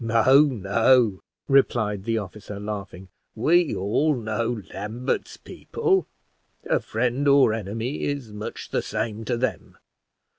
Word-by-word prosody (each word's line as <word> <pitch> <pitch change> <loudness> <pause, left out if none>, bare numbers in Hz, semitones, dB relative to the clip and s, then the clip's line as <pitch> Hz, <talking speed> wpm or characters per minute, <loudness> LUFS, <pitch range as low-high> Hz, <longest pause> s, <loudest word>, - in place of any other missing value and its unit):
"No, 115 +5 +5
no," 115 -2 +2 0.3
replied 110 -7 +2
the 115 -1 0
officer, 105 0 -7
laughing, 100 -3 -6 0.3
"we 165 +8 +3
all 140 +11 +1
know 115 -1 -2
Lambert's 110 +6 -3
people 390 -4 -1 0.6
a - - +2
friend 125 +5 -1
or 140 -5 +5
enemy 115 +6 -4
is 140 -7 -3
much 105 +1 -7
the - - 0
same 110 +1 -3
to 120 +2 -1
them. 130 +2 -3
115 Hz, 120 wpm, -24 LUFS, 105-130 Hz, 0.6 s, No